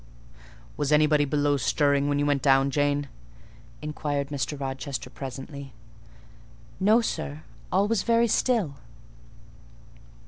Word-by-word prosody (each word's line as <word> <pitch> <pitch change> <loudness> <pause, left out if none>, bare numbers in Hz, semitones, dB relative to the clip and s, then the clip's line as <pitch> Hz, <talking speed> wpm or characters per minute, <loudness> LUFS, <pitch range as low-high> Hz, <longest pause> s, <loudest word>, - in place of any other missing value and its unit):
"Was 145 0 -1
anybody 150 -1 +4 0.3
stirring 140 +5 +2
below - - 0
when 145 - +1
you 145 - +1
went 145 -2 +1
down, 135 0 +4
Jane?" 145 0 +1 0.8
inquired 145 -2 -2
Mr. 145 0 -3
Rochester 135 -1 -5
presently. 135 0 -8 1.1
"No, 215 +5 +4
sir; 155 -8 -4 0.3
all 195 +3 +3
was 225 -3 +1
very 235 0 +3
still." 215 - +1
145 Hz, 110 wpm, -26 LUFS, 140-155 Hz, 1.1 s, anybody